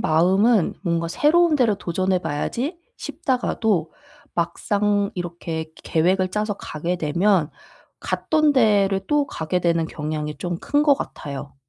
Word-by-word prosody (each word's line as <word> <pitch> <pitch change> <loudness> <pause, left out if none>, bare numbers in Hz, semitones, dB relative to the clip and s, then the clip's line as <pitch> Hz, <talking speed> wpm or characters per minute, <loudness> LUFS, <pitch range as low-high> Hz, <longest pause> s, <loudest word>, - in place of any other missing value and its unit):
마음은 190 +6 +3
'뭔가 170 -2 -1
새로운 330 - +3
데를 230 -6 +2
도전해 185 +1 0
봐야지.' 245 - -3 0.2
싶다가도 220 - -1 0.4
막상 200 +4 0
이렇게 170 -2 -4
그 160 - -24
계획을 185 +3 +2
짜서 210 0 -1
가게 170 -1 -4
되면 170 +1 +1 0.5
갔던 310 -1 +1
데를 200 -6 +3
또 295 -1 +2
가게 180 -1 -2
되는 170 -1 +1
경향이 150 -1 -4
좀 175 +2 -3
큰 290 0 +1
것 290 -2 +5
같아요. 140 - -7
185 Hz, 270 characters per minute, -22 LUFS, 165-220 Hz, 0.5 s, 것